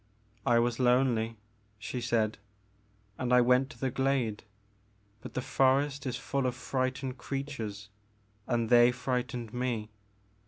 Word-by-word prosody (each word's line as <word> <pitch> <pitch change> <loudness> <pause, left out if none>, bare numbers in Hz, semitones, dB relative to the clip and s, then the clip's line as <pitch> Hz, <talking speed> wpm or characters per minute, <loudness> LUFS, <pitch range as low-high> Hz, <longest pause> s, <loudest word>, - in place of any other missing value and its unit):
I 120 -2 +5
was 120 0 +1
lonely," 120 -3 +2 0.4
she 105 +4 -5
said, 110 -3 0 0.8
and 125 -1 -1
I 125 - +7
went 125 +2 +4
to - - -13
the 130 -1 -1
glade, 130 -5 0 0.8
but - - -10
the 130 - -1
forest 135 +1 +2
is 125 -1 -2
full 135 +1 -1
of 125 - -2
frightened 130 0 -2
creatures 115 -9 -5 0.6
and 115 -2 0
they 120 0 +7
frightened 125 -2 -3
me. 120 -4 -2
125 Hz, 130 wpm, -30 LUFS, 115-130 Hz, 0.8 s, I